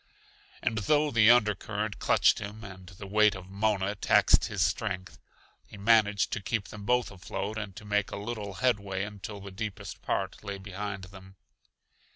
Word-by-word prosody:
And 110 - 0
though 150 +7 +2
the 115 -1 +6
under 115 -3 +6
current 105 +1 -4
clutched - - +4
him 105 +1 -7
and 95 -3 -10
the 95 +1 -10
weight 105 +1 +4
of 95 0 -10
Mona 100 -1 0
taxed 100 - +4
his - - 0
strength, 95 -5 -2 0.5
he 105 - -12
managed 105 -1 +3
to 110 - -2
keep 100 0 -2
them 105 -1 -9
both 125 -1 +2
afloat 100 +3 -5
and 100 -4 -6
to 105 - -10
make 105 -1 0
a - - -5
little 105 -2 -5
headway 100 -4 0
until 105 0 -7
the 100 0 -9
deepest 105 +1 -6
part - - -2
lay 100 -1 -5
behind 100 0 -6
them. 95 0 -13
105 Hz, 175 wpm, -29 LUFS, 95-110 Hz, 0.5 s, the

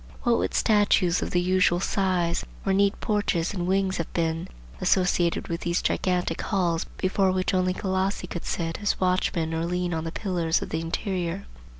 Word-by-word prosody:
What 240 -2 +3
would - - -1
statues 205 -5 +3
of - - -2
the 175 - +1
usual 180 -1 +3
size, 185 -3 0 0.2
or 195 - +2
neat 200 +1 +2
porches 205 -6 0
and 175 -3 -2
wings 190 0 +1
have 170 - -4
been, 165 +1 -1 0.3
associated 180 -2 +1
with 170 0 -3
those 170 0 0
gigantic 180 -3 0
halls 175 -5 0
before 190 0 +2
which 185 +1 0
only 185 0 +1
Colossi 190 0 -1
could 175 -1 -6
sit 165 +2 -3
as 205 - 0
watchmen 180 -3 +1
or 160 0 -1
lean 180 0 -1
on 160 -1 -2
the 165 - -4
pillars 175 -4 0
of - - -6
the 160 - -2
interior?" 180 +2 -3
180 Hz, 180 wpm, -26 LUFS, 170-190 Hz, 0.3 s, What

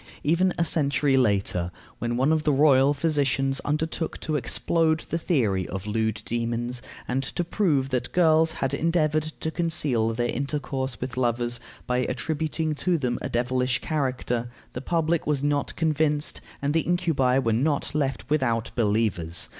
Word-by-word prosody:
Even 175 +5 +3
a 170 - +2
century 140 -3 +2
later, 100 -8 +1 0.3
when 120 0 -1
one 135 +4 +3
of 160 -1 +2
the 150 - +3
royal 140 -1 +5
physicians 140 -3 +1
undertook 160 +2 -2
to 155 - -2
explode 160 +5 +1
the 165 - -1
theory 110 - +1
of 95 +1 -5
lewd 110 0 -1
demons, 120 +1 -2 0.3
and 130 +2 0
to 135 +6 -3
prove 160 -7 +1
that 125 -2 -2
girls 160 -2 +4
had 135 -3 -2
endeavored 155 -1 +1 0.2
to 160 - -1
conceal 150 -10 +2
their 120 +1 0
intercourse 135 -3 -3
with 125 0 -5
lovers 120 -1 0 0.3
by 125 0 0
attributing 155 +4 -1
to 175 +3 0
them 125 -5 -1
a - - -3
devilish 125 +1 0
character, 130 -5 -2 0.2
the 125 - -5
public 165 +2 0
was 145 -2 0
not 145 -1 0
convinced, 155 -2 0 0.2
and 145 +1 +1
the 165 - +3
incubi 160 -8 +1
were 115 -4 +1
not 140 +7 0
left 135 -4 -1
without 120 -6 0
believers. 105 -7 0
135 Hz, 155 wpm, -25 LUFS, 120-155 Hz, 0.3 s, royal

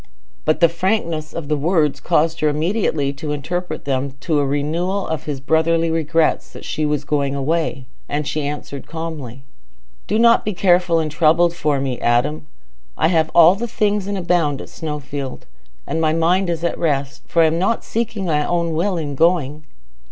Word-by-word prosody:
But 155 +2 +1
the 170 - +8
frankness 170 -3 -1
of 165 -3 -6
the 150 - +1
words 150 -1 +1
caused 165 -1 +1
her 155 - +2
immediately 155 -3 0
to 150 +2 -5
interpret 155 +3 -4
them 135 -1 0
into 140 +3 -2
a 145 - +1
renewal 165 +8 -1
of 160 -3 -3
his 145 -3 -4
brotherly 165 +3 +2
regrets 165 0 +1
that - - -10
she 155 -1 -1
was 150 -1 -1
going 140 -2 -1
away, 140 -1 -1 0.2
and 145 +1 -1
she 155 - -1
answered 145 -1 -6
calmly, 150 -6 -6 0.6
"Do 215 - +1
not 235 0 +5
be 210 -2 -3
careful 175 -2 +3
and 155 -2 -1
troubled 165 +2 +3
for 150 -4 0
me, 135 -2 -2
Adam. 140 +6 +1 0.5
I 160 - +3
have 160 -2 +2
all 170 +1 +8
things 210 -2 -1
and 200 0 -2
abound 170 -6 +1
at - - -9
Snowfield. 145 -4 -6 0.4
And 160 - -2
my 155 -1 +2
mind 175 +3 +2
is 170 -1 -2
at 170 - -1
rest, 140 -4 -1
for 165 - +3
I - - +5
am 160 +1 +1
not 195 +5 0
seeking 225 -3 -3
my 150 -3 +1
own 170 0 0
will 180 +4 0
in 150 -3 -3
going." 155 -1 +1
160 Hz, 180 wpm, -20 LUFS, 145-175 Hz, 0.6 s, the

